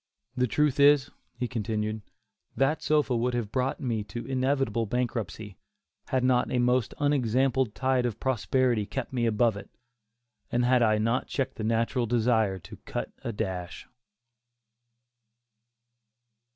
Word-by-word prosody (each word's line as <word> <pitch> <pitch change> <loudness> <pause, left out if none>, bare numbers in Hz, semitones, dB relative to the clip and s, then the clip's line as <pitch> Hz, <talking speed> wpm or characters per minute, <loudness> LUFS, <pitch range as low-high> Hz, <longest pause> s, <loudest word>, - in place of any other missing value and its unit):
The 125 -1 +1
truth 145 +3 +1
is," 140 -1 +5 0.3
he 125 0 -2
continued, 110 -2 -2 0.6
"that 135 +5 +2
sofa 150 -4 +2
would 120 +1 0
have 115 -4 -3
brought 130 +1 -1
me 115 -7 -2
to 120 +2 -7
inevitable 130 -3 0
bankruptcy, 115 -4 -3 0.5
had 130 -1 0
not 125 -1 +2
a - - +1
most 125 0 +1
unexampled 130 -3 +1
tide 130 -2 +1
of 115 -2 -5
prosperity 125 -3 +1
kept 135 +1 -5
me 120 -2 +1
above 115 0 +2
it, - - -10 0.8
and 120 0 +2
had 125 0 +4
I 110 -2 +4
not 115 +4 0
checked 135 -1 -3
the 110 - -4
natural 115 +2 0
desire 110 -4 +2
to 90 - -12
'cut - - -5
a 115 - -2
dash. 90 -4 -5
125 Hz, 140 wpm, -28 LUFS, 110-130 Hz, 0.8 s, is